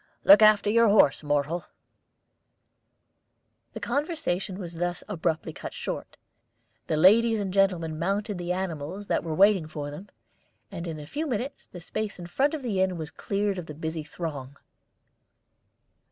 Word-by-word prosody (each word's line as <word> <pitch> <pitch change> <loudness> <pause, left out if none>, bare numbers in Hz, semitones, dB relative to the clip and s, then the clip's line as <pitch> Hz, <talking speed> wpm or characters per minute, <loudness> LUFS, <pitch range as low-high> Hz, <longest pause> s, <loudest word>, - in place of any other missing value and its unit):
Look 295 -3 +8
after 215 -1 +6
your 230 +2 +5
horse, 200 -9 +5
Mohrle." 150 +3 -1 2.1
The - - -6
conversation 245 - -2
was 175 -4 -7
thus 175 +1 -2
abruptly 165 -5 -2
cut - - -8
short. - - -5 0.7
The 155 - 0
ladies 220 +6 +5
and 195 -2 -3
gentlemen 175 -5 +1
mounted 200 +3 -1
the 175 0 -3
animals 180 +1 -4
that - - 0
were 160 -2 -3
waiting 195 -3 +4
for 145 -2 -6
them, 180 +8 -10 0.6
and 175 -3 -6
in 160 -2 -5
a 150 - -8
few 300 - -3
minutes 255 +2 -4
the 180 - -10
space 210 +4 -4
in 175 - -8
front 275 - +1
of 295 - -7
the 205 -6 0
inn 185 -2 +1
was 160 -1 -6
cleared 200 +1 -2
of 170 - -8
the 150 - -8
busy 160 +1 -4
throng. 145 -4 -6
180 Hz, 155 wpm, -27 LUFS, 160-210 Hz, 2.1 s, Look